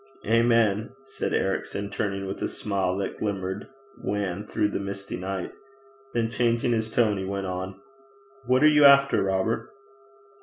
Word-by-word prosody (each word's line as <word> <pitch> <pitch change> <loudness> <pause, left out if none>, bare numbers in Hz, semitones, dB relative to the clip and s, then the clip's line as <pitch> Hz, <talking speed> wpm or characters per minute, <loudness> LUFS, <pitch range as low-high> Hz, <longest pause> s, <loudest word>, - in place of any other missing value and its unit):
'Amen,' 115 0 +2
said 135 0 -4
Ericson, 100 +1 -1
turning 100 -1 -2
with 95 +1 -5
a - - 0
smile 95 -3 -1
that 100 -1 -4
glimmered 95 -1 -3 0.3
wan 100 0 -3
through 105 - 0
the - - -3
misty 100 0 -5
night. 95 0 -4 0.6
Then 115 -1 0
changing 120 0 +1
his 110 -1 0
tone, 110 -3 +2
he - - -3
went 100 0 -3
on: 95 +1 -5 0.7
'What 130 +2 +3
are - - +8
you 150 -1 +5
after, 140 0 +7
Robert?' 95 +4 0
100 Hz, 150 wpm, -26 LUFS, 95-115 Hz, 0.7 s, are